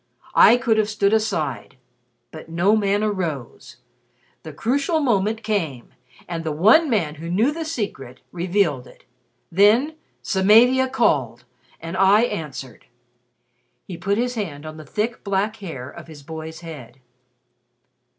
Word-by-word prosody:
I 240 - +7
could 230 -3 +1
have 215 -1 +1
stood 205 -1 +1
aside. 160 - -2 0.5
But 160 0 -11
no 175 +6 +2
man 205 -1 +1
arose. 170 - -4 0.6
The - - -9
crucial 280 +7 0
moment 220 -4 0
came 165 - -2 0.4
and 170 -1 -4
the 160 - -2
one 220 - +4
man 175 -11 0
who 165 - -6
knew 215 +11 +2
the 325 +2 -4
secret, 200 - -5
revealed 175 -6 0
it. - - -18 0.5
Then 215 - +4 0.3
Samavia 235 +7 +4
called, 130 - 0 0.3
and 165 +3 -6
I 195 +3 +5
answered." 150 - -5 1.0
He 185 - -7
put 200 +4 -1
his 245 +1 -1
hand 160 -10 -5
on 155 0 -8
the 155 -2 -11
thick, 220 - -3
black 200 +2 -1
hair 145 - -8
of - - -12
his 150 -3 -12
boy's 160 +2 -8
head. 140 -7 -10
195 Hz, 140 wpm, -22 LUFS, 155-220 Hz, 1.0 s, I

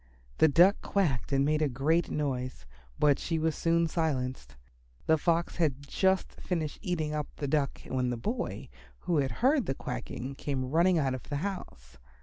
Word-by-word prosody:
The - - +7
Duck 175 +7 +6
quacked 160 -13 0
and 135 0 +3
made 155 +1 +1
a 150 - +2
great 155 +7 +1
noise, 130 - -3 0.3
but 145 -2 +3
she 165 - -1
was 160 0 +1
soon 170 0 +2
silenced. 130 - -2 0.5
The 160 - +5
Fox 170 +2 0
had 145 -5 0
just 190 +3 0
finished 160 -5 -2
eating 160 -6 -2
up 150 -1 -2
the 145 - -3
Duck 140 -1 0
when 125 -1 -1
the 120 - -2
boy, 225 - -3 0.3
who 175 -3 0
had 135 -2 +2 0.2
heard 275 -2 +3
the 135 - -1
quacking, 135 0 -5
came 135 -1 -3
running 170 +3 +4
out 135 -4 +1
of 130 - -7
the 145 - -2
house. 65 - -7
150 Hz, 175 wpm, -30 LUFS, 135-170 Hz, 0.5 s, The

